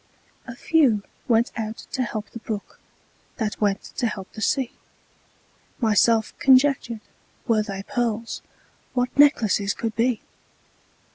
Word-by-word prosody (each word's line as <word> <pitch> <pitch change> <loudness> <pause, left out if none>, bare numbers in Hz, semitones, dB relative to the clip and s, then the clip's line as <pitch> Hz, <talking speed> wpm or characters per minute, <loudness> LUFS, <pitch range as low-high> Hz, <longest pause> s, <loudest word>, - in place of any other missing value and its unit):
A 235 - -7
few 250 -9 +3 0.2
went 230 0 +3
out 220 0 -4
to 260 - -1
help 220 -3 -4
the 230 - -7
brook, 215 -2 -6 0.6
That 220 -3 -3
went 200 -1 +1
to 240 - +1
help 195 -4 -6
the 220 - -8
sea. 260 +3 +1 1.1
Myself 225 -1 +3
conjectured, 260 -4 +4 0.5
Were 225 -3 +3
they 195 -2 -5
pearls, 230 0 -2 0.5
What 250 0 0
necklaces 215 -9 +4
could 225 -1 -3
be! 235 0 +1
230 Hz, 125 wpm, -24 LUFS, 215-250 Hz, 1.1 s, conjectured